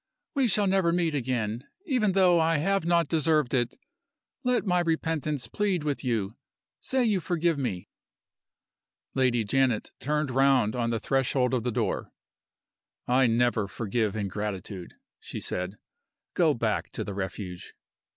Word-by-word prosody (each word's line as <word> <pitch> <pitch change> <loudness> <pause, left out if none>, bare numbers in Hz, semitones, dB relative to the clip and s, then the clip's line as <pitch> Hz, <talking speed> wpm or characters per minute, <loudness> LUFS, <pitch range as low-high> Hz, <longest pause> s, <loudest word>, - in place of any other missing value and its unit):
We 275 -4 +2
shall 210 -1 +2
never 190 -3 +3
meet 170 -2 +1
again. 120 -3 -2 0.2
Even 245 - +1
though 180 -3 +5
I 165 0 +3
have 195 +4 +1
not 170 -2 +3
deserved 155 -4 +2
it, 120 -2 0 0.7
let 250 -2 +1
my 180 -2 +2
repentance 160 -5 -1
plead 190 - 0
with 145 -2 -2
you! 110 -4 -1 0.4
Say 260 -1 0
you 210 -4 +2
forgive 170 -3 0
me!" 95 -10 -3 1.3
Lady 125 -3 +2
Janet 125 +1 +1
turned 150 +1 -1
round 130 -4 +3
on 120 -1 0
the 115 -1 0
threshold 130 +1 +1
of 125 - +1
the 125 +2 -1
door. - - -2 1.0
"I 125 +1 +4
never 115 -2 +2
forgive 110 0 -1
ingratitude," 100 -2 -4 0.2
she - - -7
said. 90 +3 -3 0.6
"Go - - +3
back - - -1
to - - -3
the 100 - -5
Refuge." 95 -2 -6
135 Hz, 140 wpm, -27 LUFS, 115-170 Hz, 1.3 s, though